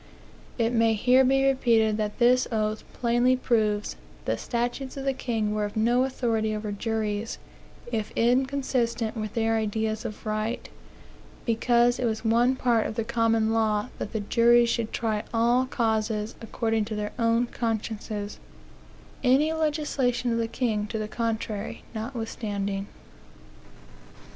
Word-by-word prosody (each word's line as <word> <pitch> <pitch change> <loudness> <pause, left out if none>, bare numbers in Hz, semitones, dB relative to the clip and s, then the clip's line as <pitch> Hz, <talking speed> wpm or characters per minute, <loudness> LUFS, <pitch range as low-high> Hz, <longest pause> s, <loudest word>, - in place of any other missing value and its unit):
It 230 -1 +1
may 225 -1 +3
here 250 +5 +5
be 270 +1 +3
repeated 230 -5 +3
that 210 -1 -2
this 250 +1 +4
oath 215 -1 -1
plainly 240 +1 +2
proves 215 -5 0 0.3
that - - 0
the 110 - 0
statutes 245 +3 -3
of 270 - -5
the 270 - +2
king 225 -5 -1
were 210 0 0
of 205 +1 -6
no 240 +4 +3
authority 225 -4 -1
over 210 0 -4
juries, 215 0 -2 0.5
if 220 -3 -2
inconsistent 250 -2 +1
with 215 -2 -4
their 225 -1 +2
ideas 220 0 -1
of 215 - -7
right; 215 +2 -2 0.8
because 240 +1 +3
it 250 - 0
was 220 0 -2
one 240 +3 +3
part 240 -3 +2
of - - -6
the 230 - 0
common 225 -1 +1
law 220 0 +1
that 210 -1 -4
juries 235 0 +5
should 230 -2 -1
try 220 -2 -1
all 240 +3 +2
causes 220 -2 -1
according 225 -1 -1
to 215 0 -4
their 210 0 -3
own 230 +1 +3
consciences, 220 -3 -4 0.8
any 280 +5 +4
legislation 285 -6 0
of 230 - 0
the 230 - 0
king 225 -3 -1
to 220 - -4
the 215 -1 -3
contrary 220 -2 -3
notwithstanding. 215 -4 -3
230 Hz, 145 wpm, -26 LUFS, 215-245 Hz, 0.8 s, here